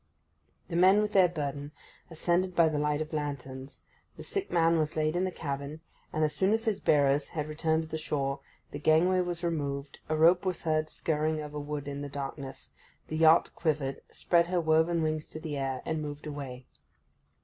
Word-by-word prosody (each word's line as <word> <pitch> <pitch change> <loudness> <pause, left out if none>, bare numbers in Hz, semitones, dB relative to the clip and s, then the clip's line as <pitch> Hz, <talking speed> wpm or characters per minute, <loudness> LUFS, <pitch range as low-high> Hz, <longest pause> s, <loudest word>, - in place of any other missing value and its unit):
The 170 - -4
men, 185 +4 +6
with 210 0 0
their 190 -3 +6
burden, 145 -2 -4 0.4
ascended 175 +2 0
by 165 -2 +5
the 150 -1 -1
light 150 0 0
of 155 +1 -5
lanterns, 140 -2 -5 0.4
the - - -8
sick 395 -1 -3
man 165 -1 +3
was 155 -1 -1
laid 155 +1 +1
in 180 +1 +1
the 185 - -2
cabin, 140 -1 -5 0.3
and, 155 - 0
as 150 - +1
soon 195 +2 +2
as 225 +1 0
his 215 -3 0
bearers 145 -3 +3
had 150 -2 -3
returned 160 +1 0
to - - -9
the 160 0 -4
shore, 140 -3 -2 0.3
the 145 - -5
gangway 165 +5 +4
was 175 -1 -4
removed, 140 -4 -3
a 155 - +1
rope 170 +4 +5
was 185 -2 -2
heard 155 -1 0
skirring 155 0 -1
over 150 0 -5
wood 145 -1 -5
in 140 0 -4
the 145 - -5
darkness, 140 -1 -7 0.4
the 155 - -2
yacht 160 +1 +5
quivered, 150 -5 -1
spread 170 -1 +2
her 180 0 +1
woven 160 +1 +2
wings 155 -1 -1
to 155 - -7
the 155 -2 -5
air, 135 -2 -3
and 160 -1 -2
moved 145 0 -6
away. 135 -4 -6
155 Hz, 195 wpm, -29 LUFS, 145-170 Hz, 0.4 s, men